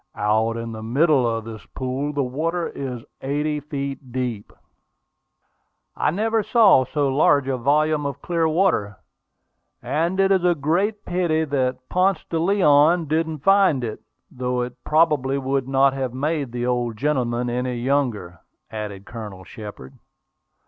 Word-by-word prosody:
"Out 110 +2 +1
in 115 0 -5
the 110 -1 -7
middle 135 +3 +2
of 115 -1 -2
this 110 -1 -8
pool, 130 +3 -2
the 145 -1 -1
water 165 +7 -2
is 125 -4 -6 0.2
eighty 150 +2 -1
feet 140 -3 -6
deep." 120 -5 -4 1.4
"I - - +1
never 220 +6 0
saw 205 - +5
so 145 +2 0
large 140 0 +3
a 135 - 0
volume 150 +3 +1
of 140 - -6
clear 165 -2 +1
water; 155 - +1 0.8
and 170 +5 -1
it 195 0 +3
is 190 -2 +3
a 175 -1 +3
great 185 +8 -1
pity 170 -3 0
that 130 -3 -2
Ponce 185 0 +1
de 165 - 0
Leon 165 -2 +4
didn't 160 -2 -1
find 195 -9 +4
it, 110 -2 -5 0.3
though 125 0 -2
it 125 0 -9
probably 150 -4 +2
would 135 -1 -1
not 135 0 +3
have 130 -2 -3
made 145 -1 -1
the 120 0 -3
old 120 -2 -1
gentleman 125 -3 0
any 125 +1 -2
younger," 120 - -1 0.3
added 105 -2 -6
Colonel 105 -5 -8
Shepard. 105 -10 -10
135 Hz, 150 wpm, -22 LUFS, 120-160 Hz, 1.4 s, saw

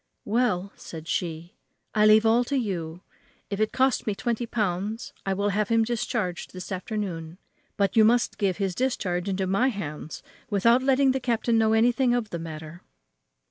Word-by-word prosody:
"Well," 205 -4 0
said 160 -1 -9
she, 170 0 -3 0.4
"I 215 -1 +4
leave 215 +1 +6
all 230 +2 +4
to 280 - -2
you. 175 -8 -3 0.5
If 200 - -2
it 215 0 +1
costs 265 -2 +1
me 210 - 0
twenty 235 +2 -2
pounds 210 0 -2
I 195 - +1
will 200 +1 0
have 205 0 0
him 230 -1 +4
discharged 225 -6 -2
this 185 +2 -8
afternoon. 185 -4 -4 0.4
But 200 -1 +1
you 220 - +7
must 240 +2 +2
give 195 -4 +1
his 195 -3 -1
discharge 190 -6 -1
into 190 0 -1
my 195 +7 +2
hands 160 - -5 0.3
without 230 +4 +4
letting 265 0 +3
the 265 - -1
captain 235 -2 +1
know 220 0 +3
anything 240 +2 +3
of 225 -4 -2
the 170 - -3
matter." 160 +1 -8
210 Hz, 175 wpm, -26 LUFS, 180-235 Hz, 0.5 s, you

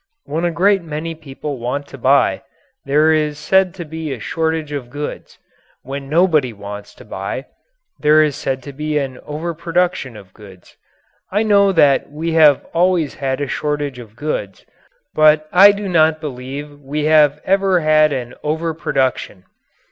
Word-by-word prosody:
When 160 +4 -3
a 175 - +1
great 195 +3 +2
many 165 0 -5
people 145 -3 -7
want 125 +4 -3
to 140 - -10
buy, 130 -7 +3 0.4
there 150 +3 +3
is 150 -1 0
said 185 +4 +2
to 175 -3 -7
be 160 -1 -6
a 130 - -5
shortage 160 +3 -2
of 140 -4 -5
goods. 145 +3 -7 0.5
When 135 +1 -7
nobody 155 -6 +2
wants 100 0 -9
to - - -15
buy, - - -5 0.5
there 155 +1 +5
is 150 -3 -1
said 135 -3 -3
to 140 - -9
be 150 +2 -2
an 135 -3 -3
overproduction 170 -3 -2
of 95 -3 -15
goods. 95 -4 -16 0.6
I 205 +3 +1
know 200 -2 +4
that 145 -5 +3
we 160 +3 -3
have 155 -4 +5
always 170 -3 +1
had 135 0 -3
a 145 - -1
shortage 145 -2 -3
of 110 -3 -12
goods, 115 -8 -4 0.5
but 155 0 +4
I 195 +3 +8
do 200 0 -5
not 160 -3 +3
believe 145 0 -7
we 145 +2 -3
have 150 -2 +4
ever 195 -2 +2
had 155 -1 +4
an 125 -3 -4
overproduction. 150 - -2
150 Hz, 160 wpm, -18 LUFS, 135-165 Hz, 0.6 s, I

